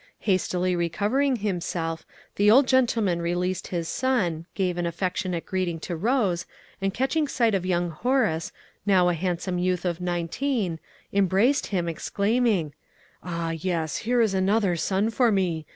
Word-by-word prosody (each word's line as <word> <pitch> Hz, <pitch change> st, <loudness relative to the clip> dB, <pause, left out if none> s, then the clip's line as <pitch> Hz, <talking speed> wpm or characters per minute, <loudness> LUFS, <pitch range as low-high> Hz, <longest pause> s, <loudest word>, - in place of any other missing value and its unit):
Hastily 185 Hz, -2 st, +1 dB
recovering 210 Hz, -, +1 dB
himself, 175 Hz, -6 st, -3 dB, 0.3 s
the 205 Hz, +1 st, +4 dB
old 260 Hz, +6 st, +7 dB
gentleman 225 Hz, -9 st, +2 dB
released 180 Hz, +2 st, -1 dB
his 170 Hz, -2 st, -3 dB
son, 180 Hz, -12 st, 0 dB
gave 180 Hz, -3 st, 0 dB
an 175 Hz, -, 0 dB
affectionate 180 Hz, 0 st, -2 dB
greeting 180 Hz, -3 st, -2 dB
to 175 Hz, -, -4 dB
Rose, 195 Hz, -3 st, 0 dB, 0.3 s
and 195 Hz, 0 st, +1 dB
catching 270 Hz, +7 st, 0 dB
sight 235 Hz, -5 st, +1 dB
of 185 Hz, -2 st, 0 dB
young 175 Hz, -1 st, 0 dB
Horace, 215 Hz, -, 0 dB, 0.3 s
now 185 Hz, -3 st, +4 dB
a -, -, +2 dB
handsome 180 Hz, +1 st, -2 dB
youth 180 Hz, 0 st, 0 dB
of 175 Hz, 0 st, -2 dB
nineteen, 175 Hz, -, -1 dB, 0.3 s
embraced 200 Hz, +8 st, +3 dB
him, 180 Hz, -4 st, -1 dB
exclaiming, 200 Hz, -1 st, 0 dB, 0.5 s
"Ah, 170 Hz, -2 st, -3 dB
yes, 165 Hz, -2 st, -2 dB
here 240 Hz, +2 st, +1 dB
is 220 Hz, -4 st, +2 dB
another 195 Hz, 0 st, +2 dB
son 195 Hz, +6 st, 0 dB
for 240 Hz, 0 st, +3 dB
me! 175 Hz, -6 st, 0 dB
185 Hz, 145 wpm, -25 LUFS, 170-215 Hz, 0.5 s, old